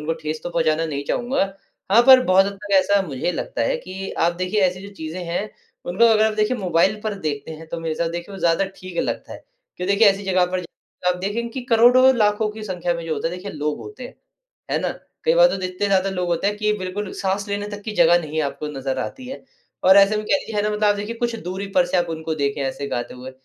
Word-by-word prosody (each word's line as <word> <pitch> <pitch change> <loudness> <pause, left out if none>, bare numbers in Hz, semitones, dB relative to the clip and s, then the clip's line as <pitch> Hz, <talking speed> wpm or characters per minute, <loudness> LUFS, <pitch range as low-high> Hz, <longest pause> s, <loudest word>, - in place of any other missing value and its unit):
उनको 155 +2 -2
ठेस 155 -1 -5
तो - - -5
पहुँचाना 165 -1 +1
नहीं 140 -2 -4
चाहूँगा। 245 +2 0 0.5
हाँ, 235 +3 +7
पर 260 -1 +9
बहुत 190 +1 +5
हद 200 - -3
तक 200 0 -8
ऐसा 200 +2 +3
मुझे 145 +4 -2
लगता - - -3
है - - +1
कि 195 - -7
आप 170 - +1
देखिए 185 +3 -1
ऐसी 180 0 -3
जो 200 - -12
चीज़े 160 0 -6
हैं 175 +5 -3 0.3
उनको 185 +6 +2
अगर 220 -2 +5
आप 220 - 0
देखिए 215 +4 +1
मोबाइल 190 +1 +1
पर 215 -1 -1
देखते 145 -1 -4
हैं 160 +1 -9
तो 170 +1 -5
मेरे 165 -1 -3
हिसाब 170 - -1
से 165 - -3
देखिए 175 +3 -6
वो - - -8
ज़्यादा 170 +3 +2
ठीक 185 -2 -8
लगता - - -4
है। - - -11 0.3
क्यों 180 - -4
देखिए 200 +2 +5
ऐसी 195 +1 +1
जगह 185 -1 +3
पर 185 0 -1
जाकर 180 +1 -7
आप - - -6
देखेंगे 225 +5 -2
की 260 +2 -5
करोड़ों-लाखों 235 -3 +4
की 215 +1 -9
संख्या 180 -3 -2
में 170 0 -5
जो 160 - -1
होता - - -2
है 175 - -5
देखिए 200 +2 -7
लोग 150 0 -2
होते 420 +1 -9
हैं। - - -10 0.6
है - - +1
ना? - - -1 0.4
कई 480 +1 +4
बार - - +7
तो - - -5
इतने 185 +2 -2
ज़्यादा 195 0 +2
लोग 180 -2 -2
होते 170 +3 0
है 205 - +2
कि 210 0 0
बिल्कुल 190 +2 -4
साँस 200 +1 -1
लेने 205 0 -3
तक 205 0 -8
की 215 - -5
जगह 170 +1 +6
नहीं 155 0 -3
आपको 150 +1 -4
नज़र 135 -2 -3
आती 255 - -5
है। 265 - -8 0.4
और 190 +1 +7
ऐसे 200 +2 +6
में 210 - -3
कह - - +3
लीजिए 225 - -7
है 205 - +2
ना 210 - 0
मतलब 210 0 -1
आप 205 - +4
देखिए 210 +3 -4
कुछ 235 0 -1
दूरी 190 +2 -4
पर 180 -1 +5
से 180 - 0
आप 175 - +2
उनको 160 0 -3
देखे 140 -1 -1
ऐसे 135 +1 -3
गाते 120 -3 -4
हुए, 125 +1 -9
190 Hz, 260 wpm, -22 LUFS, 165-210 Hz, 0.6 s, पर